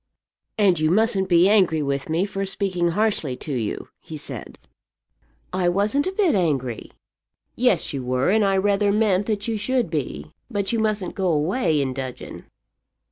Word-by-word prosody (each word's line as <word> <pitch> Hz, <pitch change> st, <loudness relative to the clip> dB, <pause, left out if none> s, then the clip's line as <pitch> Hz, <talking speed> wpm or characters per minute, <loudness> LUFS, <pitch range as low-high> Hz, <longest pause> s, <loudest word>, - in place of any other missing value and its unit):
"And 195 Hz, -6 st, +3 dB
you 155 Hz, 0 st, +2 dB
mustn't 200 Hz, 0 st, +2 dB
be 175 Hz, +1 st, +5 dB
angry 185 Hz, -7 st, +3 dB
with 140 Hz, 0 st, -2 dB
me 165 Hz, +4 st, +1 dB
for 195 Hz, -1 st, -4 dB
speaking 190 Hz, -3 st, -1 dB
harshly 200 Hz, -12 st, 0 dB
to 150 Hz, -, -5 dB
you," 115 Hz, -5 st, -3 dB
he 155 Hz, -, -9 dB
said. 145 Hz, -, -8 dB, 1.0 s
"I 180 Hz, -1 st, +1 dB
wasn't 205 Hz, -, +1 dB
a -, -, -1 dB
bit 385 Hz, -3 st, +2 dB
angry." 140 Hz, -, -1 dB, 0.7 s
"Yes, -, -, +1 dB
you 135 Hz, -2 st, -3 dB
were; 130 Hz, +6 st, +1 dB
and 215 Hz, +1 st, +3 dB
I 195 Hz, -1 st, +2 dB
rather 200 Hz, +1 st, +2 dB
meant 205 Hz, -2 st, +2 dB
that 210 Hz, -1 st, -2 dB
you 225 Hz, -1 st, -1 dB
should 235 Hz, -2 st, -1 dB
be. 75 Hz, -, -4 dB, 0.2 s
But 200 Hz, -4 st, -2 dB
you 230 Hz, -, +1 dB
mustn't 215 Hz, -3 st, -1 dB
go 190 Hz, -1 st, -1 dB
away 160 Hz, -, +1 dB
in 135 Hz, -2 st, -1 dB
dudgeon." 130 Hz, -1 st, -7 dB
190 Hz, 170 wpm, -23 LUFS, 150-210 Hz, 1.0 s, be